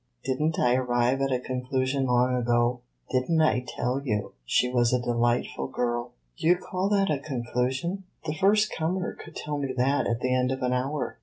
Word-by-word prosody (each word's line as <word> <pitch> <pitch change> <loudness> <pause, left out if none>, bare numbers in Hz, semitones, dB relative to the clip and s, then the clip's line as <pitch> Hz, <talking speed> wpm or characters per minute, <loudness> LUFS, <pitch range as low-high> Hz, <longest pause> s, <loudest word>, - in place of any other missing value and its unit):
Did 130 +2 -1
n't 155 +1 +1
I 125 - +3
arrive 125 +1 +1
at 135 0 +1
a 125 - +1
conclusion 130 +1 -1
long 125 +1 +3
ago? 120 0 +1 0.3
Did 130 +2 0
n't 160 -1 +4
I 125 -5 +2
tell 125 +3 -2
you 105 -6 -2
she 90 - +2
was 120 -1 +2
a 125 - +2
delightful 120 0 0
girl?" 120 -1 -2 0.3
"Do - - 0
you 175 - +7
call 185 +2 -2
that 200 -3 +2
a 145 - 0
conclusion? 130 +7 -2 0.2
The 150 - -1
first 205 +6 +3
comer 175 +3 -1
could 160 - -12
tell 150 -1 -3
me 135 -2 -2
that 135 +3 +2
at 115 +1 -1
the 130 0 +1
end 125 0 +2
of 130 -1 -3
an 125 0 +1
hour." 135 +3 -2
130 Hz, 205 wpm, -27 LUFS, 125-150 Hz, 0.3 s, you